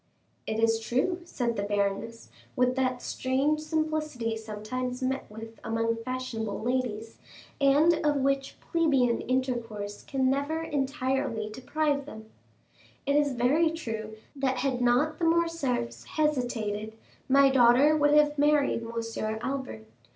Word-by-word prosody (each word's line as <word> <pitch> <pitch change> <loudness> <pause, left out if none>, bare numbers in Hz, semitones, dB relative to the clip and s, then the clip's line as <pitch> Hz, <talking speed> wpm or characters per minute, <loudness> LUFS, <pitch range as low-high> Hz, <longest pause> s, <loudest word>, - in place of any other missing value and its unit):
"It 220 0 -2
is 225 0 +3
true," 255 +11 0
said 240 -8 -2
the - - 0
baroness, 205 +3 -2 0.2
with 250 0 +2
that 255 -2 -1
strange 270 +4 0
simplicity 310 -7 -2
sometimes 225 +4 -5
met 265 +1 -2
with 225 +1 -10
among 230 +1 0
fashionable 230 -3 -4
ladies, 230 -2 -2 0.4
and 290 +4 +5
of 295 -1 +2
which 275 0 -1
plebeian 275 -8 +2
intercourse 235 -5 -2
can 265 -1 -1
never 285 +5 0
entirely 270 -6 -1
deprive 285 +4 -1
them,—"it 220 +3 -8
is 290 -2 +3
very 275 +7 +3
true 225 -9 -5 0.2
that 265 -2 0
had 255 -2 -1
not 255 +6 +2
the 335 - +1
Morcerfs 325 - 0
hesitated, 225 -8 -1 0.3
my 275 0 +6
daughter 260 +4 +5
would 290 -1 +4
have 295 -1 +4
married 290 -4 +3
Monsieur 230 -1 -3
Albert. 260 - -4
255 Hz, 125 wpm, -28 LUFS, 225-290 Hz, 0.4 s, my